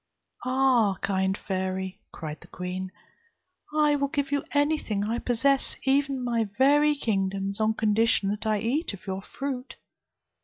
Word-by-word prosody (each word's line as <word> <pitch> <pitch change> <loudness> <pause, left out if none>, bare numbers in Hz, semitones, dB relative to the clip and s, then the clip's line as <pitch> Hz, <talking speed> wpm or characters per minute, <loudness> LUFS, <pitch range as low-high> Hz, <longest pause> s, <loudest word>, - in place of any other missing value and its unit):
'Ah! 255 -6 +3
kind 190 0 +1
fairy,' 190 -1 -3
cried 155 -2 -7
the 170 - -14
queen, 180 +1 -5 0.8
'I 300 -1 +3
will 280 0 +1
give 280 0 -2
you 285 -1 +1
anything 290 -8 +1
I 225 +3 -1
possess, 265 +3 +1
even 275 -1 +1
my 230 -3 0
very 295 +3 +5
kingdoms, 195 -4 -1
on 220 0 +2
condition 220 -2 +2
that 210 +2 -2
I 215 -1 +2
eat 265 +5 0
of 190 - -17
your 190 -1 -3
fruit.' 260 +2 -5
225 Hz, 145 wpm, -27 LUFS, 195-275 Hz, 0.8 s, very